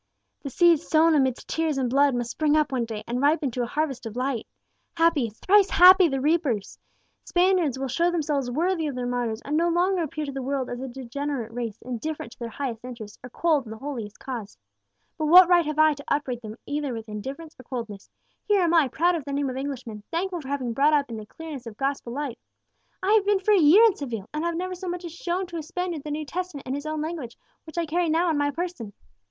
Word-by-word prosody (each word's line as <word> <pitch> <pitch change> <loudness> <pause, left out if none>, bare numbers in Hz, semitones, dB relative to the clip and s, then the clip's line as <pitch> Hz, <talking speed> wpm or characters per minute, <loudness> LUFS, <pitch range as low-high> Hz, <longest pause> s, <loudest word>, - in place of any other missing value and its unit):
"The 280 - -5
seed 340 +3 +5
sown 325 +1 +3
amidst 265 -4 +1
tears 320 -3 -1
and 260 -2 +1
blood 275 +1 +3
must 240 -1 -2
spring 305 -1 +2
up 305 -2 +1
one 250 -3 0
day, 220 -2 -6
and 245 +2 -2
ripen 290 -1 +2
to 245 - -3
a 240 - -1
harvest 270 -3 -2
of 220 - -8
light! 255 -2 -2 0.5
Happy 330 -8 +3
thrice 390 - +3
happy 370 0 +8
the 270 -3 -1
reapers! 285 - 0 0.4
Spaniards 355 -7 +2
will 270 0 -3
show 335 +7 +1
themselves 295 -6 -1
worthy 325 +4 0
of 280 - -4
their 250 -1 -3
martyrs, 245 -2 -2
and 290 - -2
no 340 +2 +2
longer 355 +2 +2
appear 310 -1 -3
to 280 - -5
the 270 0 -5
world 265 0 -2
as 245 - -4
a 265 - -4
degenerate 260 -1 -4
race, 230 -3 -4
indifferent 250 +1 -5
to - - -16
their 235 -1 -4
highest 240 -3 -5
interests, 230 -4 -9
or 250 - -8
cold 305 0 +1
in - - -9
the 220 - -7
holiest 230 -6 -6
cause. 235 - -6 0.6
But 310 - 0
what 360 +3 +9
right 350 -3 +4
have 305 -1 -3
I 310 0 +5
to 285 0 -10
upbraid 260 -5 -1
them 215 -1 -8
either 290 -2 -2
with 225 -1 -7
indifference 270 +10 -7
or - - -11
coldness? 230 -6 -7 0.4
Here 405 -3 +3
am 340 -1 +2
I, 325 -5 +5
proud 345 +8 +2
of 330 -4 -2
the 280 - -4
name 280 -1 0
of - - -7
Englishman, 260 -6 -5
thankful 350 +1 -2
for 270 - -10
having 270 -3 -2
been - - -2
brought 285 +5 +3
up 285 -4 +1
in 225 - -5
the 215 -1 -9
clearness 300 -5 -8
of 215 -2 -9
gospel 270 -2 -2
light. 270 -2 -4 0.6
I 400 +3 +3
have 430 -2 +4
been 410 -1 +3
for 390 +3 +1
a 400 - +5
year 335 +8 +7
in 445 -5 +5
Seville, 230 -8 -5
and 305 +1 -2
I - - 0
have 340 -1 -2
never 370 +1 -3
so 365 0 -6
much 355 0 -4
as 335 - -7
shown 355 +2 -2
to 345 -1 -7
a - - -3
Spaniard 345 -1 -4
the 300 - -6
New 300 +1 -3
Testament 360 -2 -5
in 260 - -3
his 285 +2 -4
own 310 0 -2
language, 305 -7 -5 0.3
which 315 0 -12
I 340 - +1
carry 335 +2 0
now 335 +3 +2
on 320 - +1
my 290 0 +2
person. 310 - -5
285 Hz, 250 wpm, -25 LUFS, 245-335 Hz, 0.6 s, what